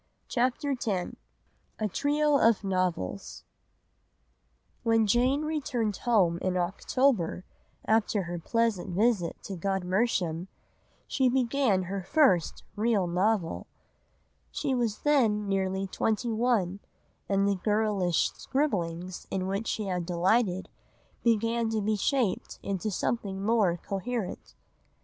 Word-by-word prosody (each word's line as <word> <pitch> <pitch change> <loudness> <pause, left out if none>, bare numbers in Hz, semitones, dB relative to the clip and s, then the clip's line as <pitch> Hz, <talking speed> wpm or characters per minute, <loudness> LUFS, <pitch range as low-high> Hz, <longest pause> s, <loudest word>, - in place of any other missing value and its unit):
CHAPTER 255 +3 0
X 255 -3 -3 0.9
A 215 - -1
TRIO 290 +6 +2
OF 225 -4 +4
NOVELS 185 - -2 1.4
When 225 -1 +3
Jane 250 +7 +2
returned 265 -9 -1
home 185 -8 +2
in 185 0 -1
October, 185 +1 0 0.4
after 220 -2 +2
her 175 0 -5
pleasant 205 -2 0
visit 205 -4 +2
to 195 - -5
Godmersham, 185 -1 0 0.6
she 260 -2 +2
began 250 -5 +2
her 195 +2 -4
first 190 - +2
real 215 -3 +2
novel. 180 - 0 0.8
She 165 - -2
was 235 -4 -1
then 225 -9 +2
nearly 190 0 0
twenty 220 +4 -1
one, 220 -5 +1 0.5
and 195 0 +2
the 200 -2 0
girlish 205 -5 +1
scribblings 185 - -2
in 185 -1 -2
which 195 +4 -2
she 215 - -2
had 180 -3 -2
delighted 185 +2 +1 0.6
began 230 0 +2
to 220 -1 0
be 215 +1 0
shaped 230 -1 0
into 200 +2 -2
something 195 -1 -2
more 205 -5 +2
coherent. 200 +3 -4
205 Hz, 115 wpm, -28 LUFS, 185-235 Hz, 1.4 s, OF